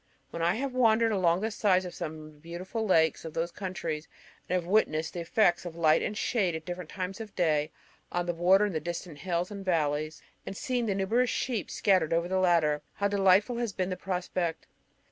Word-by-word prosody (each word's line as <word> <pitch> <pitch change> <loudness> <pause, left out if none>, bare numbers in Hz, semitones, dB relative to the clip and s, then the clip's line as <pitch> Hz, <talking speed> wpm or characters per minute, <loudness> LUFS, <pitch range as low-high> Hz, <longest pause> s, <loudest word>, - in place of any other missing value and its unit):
When 170 - -5
I 170 +3 +2
have 265 +2 -3
wandered 230 -2 +4
along 180 -3 +2
the 220 +1 -1
sides 190 -3 +2
of 180 - -6
some 155 - -5
of 155 0 -11
the 150 - -21
beautiful 180 +7 -5
lakes 160 -4 +3
of 160 -2 -8
those 170 +1 -1
counties, 170 -5 -4 0.4
and 185 - +1
have 180 -2 -1
witnessed 165 -5 +1
the 175 - -4
effects 175 +1 +2
of 175 -2 -7
light 160 -2 +4
and 210 - -3
shade 195 -8 0
at 160 0 -6
different 175 -2 -6
times 190 +2 -5
of 220 - -5
the 210 - -30
day, 155 -4 +1 0.4
on 175 0 -1
the 175 - -1
water 185 +4 +4
and 165 -7 -2
distant 170 -2 -5
hills 175 +3 -2
and 200 -1 -6
valleys, 155 -3 -1 0.2
and 195 - -7
seen 245 -3 -1
the 200 - 0
numerous 225 +6 +1
sheep 230 -7 -2
scattered 185 -6 +2
over 170 +1 +1
the 190 +1 0
latter, 165 -5 +3
how 200 - +1
delightful 200 +4 +3
has 235 -4 -2
been 185 0 -2
the - - -1
prospect! 180 -2 -3
180 Hz, 215 wpm, -29 LUFS, 165-200 Hz, 0.4 s, wandered